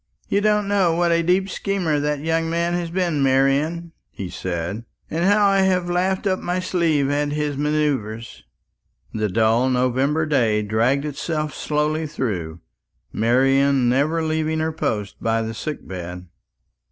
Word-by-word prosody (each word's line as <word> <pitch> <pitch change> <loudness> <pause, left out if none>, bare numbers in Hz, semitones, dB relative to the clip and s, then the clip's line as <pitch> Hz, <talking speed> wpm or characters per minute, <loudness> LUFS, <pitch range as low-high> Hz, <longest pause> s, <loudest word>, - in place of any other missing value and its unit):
"You 200 - +2
don't 210 -1 +2
know 190 -5 +2
what 170 0 +2
a 170 0 +3
deep 180 +3 +2
schemer 190 -7 -1
that 150 0 -1
young 165 +1 0
man 170 +1 0
has 175 -1 -2
been, 170 -4 0
Marian," 140 +5 +1 0.2
he 95 -2 -7
said, 90 +4 -4 0.3
"and 165 +3 0
how 205 +1 +4
I 195 0 +3
have 185 -2 +1
laughed 185 +3 0
in 185 -1 0
my 180 +1 -1
sleeve 165 -6 +1
at 145 0 0
his 150 -1 -1
manoeuvres." 140 -7 -2 0.7
The 110 -1 -1
dull 115 +5 +2
November 130 +5 +1
day 115 -8 +1
dragged 115 +7 +1
itself 150 +1 -3
slowly 150 +2 -1
through, 90 - -4 0.5
Marian 135 +3 +3
never 150 +6 +1
leaving 160 0 -1
her 160 0 0
post 110 -11 -3
by 115 0 0
the 110 0 -4
sick 150 +7 -6
bed. 90 -1 -7
150 Hz, 155 wpm, -22 LUFS, 125-170 Hz, 0.7 s, how